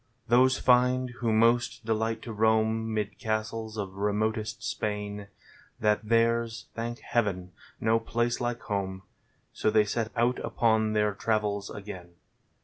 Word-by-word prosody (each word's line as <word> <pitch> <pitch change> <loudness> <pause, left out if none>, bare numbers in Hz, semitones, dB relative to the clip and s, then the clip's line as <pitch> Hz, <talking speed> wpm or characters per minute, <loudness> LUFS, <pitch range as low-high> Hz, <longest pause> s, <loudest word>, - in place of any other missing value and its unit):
Those 130 +2 +5
find, 125 0 +3
who 115 -2 0
most 115 +1 +2
delight 110 0 -1
to 115 - -6
roam 110 +1 +2
'Mid 105 -1 -3
castles 110 0 -3
of 95 -2 -5
remotest 105 +1 -1
Spain, 105 -1 -3 0.5
That 105 -1 +3
there's, 115 -1 +2
thank 120 +3 -4
Heaven, 95 -6 -1 0.3
no 115 +1 +3
place 120 +1 -1
like 120 0 -2
home; 95 -2 -3 0.5
So - - +1
they 105 -1 +4
set 110 +2 -2
out 120 +1 +2
upon 110 -2 +1
their 105 -1 +2
travels 105 -1 -1
again. 90 -4 -9
110 Hz, 135 wpm, -28 LUFS, 105-115 Hz, 0.5 s, Those